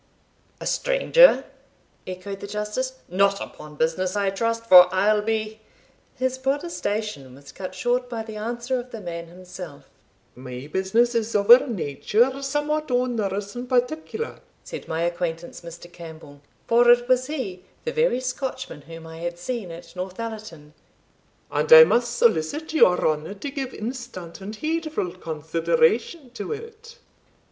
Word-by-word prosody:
"A - - -7
stranger!" - - +4 0.6
echoed 185 +2 -6
the 200 - -7
Justice 210 +5 -3
"not 200 +2 +2
upon 150 0 -9
business, 175 +5 0
I 200 -1 +1
trust, 230 +3 -1
for 180 -4 +9
I'll 210 +3 +3
be" 220 0 -2 0.6
His 260 0 -1
protestation 215 - -3
was 140 0 -14
cut 185 +4 -7
short 245 +5 0
by 230 -2 -4
the 220 -1 -9
answer 240 +4 -2
of 245 +1 -8
the 230 - -7
man 170 -3 -6
himself. 180 -3 -11 0.4
"My 125 +1 -8
business 225 +6 +2
is 230 -1 -1
of 205 +2 +4
a 250 +3 +9
nature 230 - 0
somewhat 295 +2 -1
onerous 215 -5 -1
and 245 +1 -6
particular," 310 - -1 0.2
said 485 - -8
my 160 +1 -1
acquaintance, 170 -1 -3
Mr. 170 +1 -11
Campbell 160 -4 -11 0.2
for 240 +1 +4
it 240 0 +5
was 255 0 +2
he, 215 -12 -5 0.2
the 475 - -1
very 465 - +2
Scotchman 255 - -4
whom 165 0 -10
I 160 0 -10
had 175 0 -4
seen 210 +1 -4
at 170 +2 -11
Northallerton 185 -5 -7 0.8
"and 150 +1 -1
I 160 0 +12
must 235 +7 +1
solicit 235 - +1
your 180 - +5
honour 155 +5 -2
to 275 +8 -6
give 270 -2 -4
instant 215 -9 -7
and 205 +3 -6
heedful 310 - -2
consideration 240 - 0
to 240 - -6
it. 460 +1 -10
215 Hz, 145 wpm, -24 LUFS, 175-255 Hz, 0.8 s, I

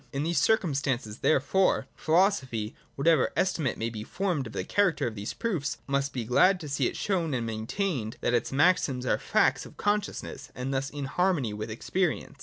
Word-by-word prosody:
In 140 +1 -2
these 165 -1 +1
circum 180 -2 +2
stances 130 -6 -2
therefore, 155 +7 +2
philosophy, 155 - +1 0.2
whatever 155 0 +3
estimate 160 -9 0
may 115 +1 -2
be 110 -2 -6
formed 175 - -2
of 115 - -10
the - - -2
character 200 -5 +1
of 120 - -2
these 105 0 -5
proofs, 180 -11 -2
must 140 0 -1
in 125 - -1
any - - -3
case - - -10
be 125 - -5
glad 185 +6 +5
to 155 - -7
see 140 0 +1
it - - -4
shown 170 -8 0
and 120 -2 -2
maintained 115 - -2
that 120 - +1
its 120 - +1
maxims 140 -3 +2
are - - +1
facts - - +2
of - - -13
consciousness, 205 0 -2
and 130 +2 -3
thus 135 +1 -1
in 145 -1 -5
harmony 155 - +1
with 105 +2 -5
experience. 145 +4 -2
140 Hz, 205 wpm, -28 LUFS, 120-180 Hz, 0.2 s, glad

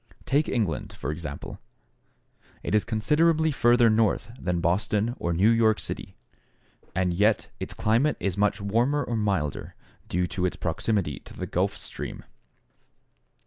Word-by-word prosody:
Take 145 +3 +2
England, 105 - -1
for 70 - -4
example: 75 -3 -6 1.0
it - - -3
is 105 - +4
considerably 160 +7 +2
further 120 -3 +4
north 110 0 +2
than 90 -1 -1
Boston 100 +6 +1
or 85 - -1
New 95 +7 +4
York 110 -2 +3
City, - - -6 0.8
and 90 -1 +1
yet 105 +4 +2
its - - -5
climate 120 +8 +2
is 95 -3 -1
much 105 0 +1
warmer 120 +9 +1
or 120 - -3
milder, 95 -9 -1 0.3
due 90 +1 +1
to 90 0 -1
its - - -4
proximity 85 - -1
to - - -14
the - - -3
Gulf - - -1
Stream. - - -6
105 Hz, 145 wpm, -26 LUFS, 90-115 Hz, 1.0 s, is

